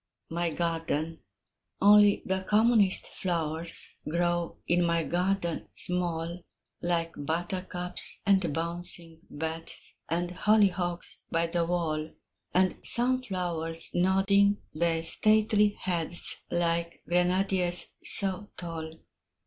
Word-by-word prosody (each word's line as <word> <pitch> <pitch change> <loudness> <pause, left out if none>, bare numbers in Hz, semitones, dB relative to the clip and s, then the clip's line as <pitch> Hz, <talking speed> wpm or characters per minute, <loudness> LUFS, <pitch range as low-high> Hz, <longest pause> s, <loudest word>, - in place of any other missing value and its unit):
MY 170 +1 -1
GARDEN 165 -1 -2 0.6
Only 205 0 +5
the 190 0 -1
commonest 215 -2 +4
flowers 165 -2 0
Grow 175 +1 -1
in 175 0 +2
my 170 -1 +1
garden 175 0 -1
small, 175 -1 -1 0.4
Like 170 -1 -1
buttercups, 180 +3 -3
and 190 -5 +2
bouncing 170 0 -1
bets, 160 +2 -6 0.2
And 175 +1 -1
hollyhocks 180 -3 +1
by 165 +1 0
the 170 0 -1
wall, 160 -3 -2 0.4
And 185 0 +1
sunflowers 180 -10 +1
nodding 200 +3 +2
their 165 0 0
stately 210 +3 +3
heads, 175 -2 -2
Like 170 -1 -1
grenadiers 180 +1 +2 0.2
so 195 0 +1
tall. 165 -2 -5
175 Hz, 95 wpm, -28 LUFS, 165-190 Hz, 0.6 s, Only